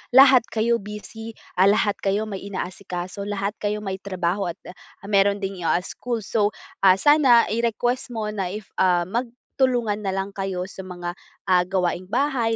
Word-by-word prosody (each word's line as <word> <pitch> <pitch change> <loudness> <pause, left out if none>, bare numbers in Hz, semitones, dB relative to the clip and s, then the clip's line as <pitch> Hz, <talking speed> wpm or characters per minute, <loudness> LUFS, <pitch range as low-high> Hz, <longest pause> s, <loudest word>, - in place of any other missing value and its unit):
lahat 265 -3 +8
kayo 235 +1 +1
busy, 210 +2 -8 0.2
ah, 190 - +7
lahat 205 0 +2
kayo 200 +2 0
may 205 -3 -5
inaasikaso, 185 0 -5
lahat 200 -1 -1
kayo 210 0 -2
may 190 -1 -4
trabaho 185 0 -2
at, 175 +2 -5
ah, 180 +2 -14
mayro'n 200 0 +3
ding, 195 -1 -3
yo 170 - -2
ah, 180 - +2
school. 235 +3 -4
So, 210 +1 0 0.2
ah, 190 -1 +6
sana 265 0 +6
i-request 235 +2 0
mo 215 -1 -2
na 195 -3 -2
if, 200 +2 -7
ah, 180 -2 +4
magtulungan 235 +1 -1
na 195 -2 -2
lang 195 +1 -2
kayo 195 -2 -3
sa - - -13
mga, 175 -1 -5 0.4
ah, 180 -1 +5
gawaing 185 -1 -1
bahay, 235 -1 +1
200 Hz, 170 wpm, -23 LUFS, 190-225 Hz, 0.4 s, lahat